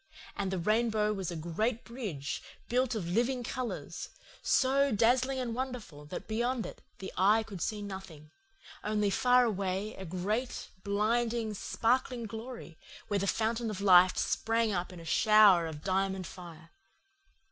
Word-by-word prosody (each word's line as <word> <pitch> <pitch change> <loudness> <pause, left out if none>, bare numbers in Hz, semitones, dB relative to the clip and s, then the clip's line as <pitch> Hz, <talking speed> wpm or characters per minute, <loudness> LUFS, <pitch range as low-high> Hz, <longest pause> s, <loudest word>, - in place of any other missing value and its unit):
And 195 -1 -2
the 190 - -1
rainbow 215 +2 +1
was 190 -4 -3
a 175 - -4
great 215 +9 -1
bridge, 200 - -5 0.3
built 250 0 +1
of 190 -6 -3
living 240 +7 +1
colours, 255 0 -5 0.3
so 275 +1 +3
dazzling 250 +5 +3
and 245 -3 -2
wonderful 240 - -5
that 150 - -7
beyond 235 +2 -1
it - - -9 0.2
the 190 - -7
eye 210 +4 +4
could 195 -5 -9
see 210 -2 -2
nothing, 190 -7 -9 0.5
only 210 -1 +1
far 250 +3 +4
away 200 -1 -2
a 190 - -8
great, 205 +8 -3
blinding, 220 +2 0
sparkling 240 +4 0
glory, 225 -5 -8 0.3
where 205 -1 +1
the 200 - -1
fountain 225 +2 0
of 205 -3 -4
life 185 -2 +6
sprang 225 0 +1
up 180 -1 -2
in 180 - -10
a 165 - -11
shower 210 -3 +6
of 155 -1 -8
diamond 190 -1 0
fire. 170 -2 -11
215 Hz, 150 wpm, -31 LUFS, 185-235 Hz, 0.5 s, life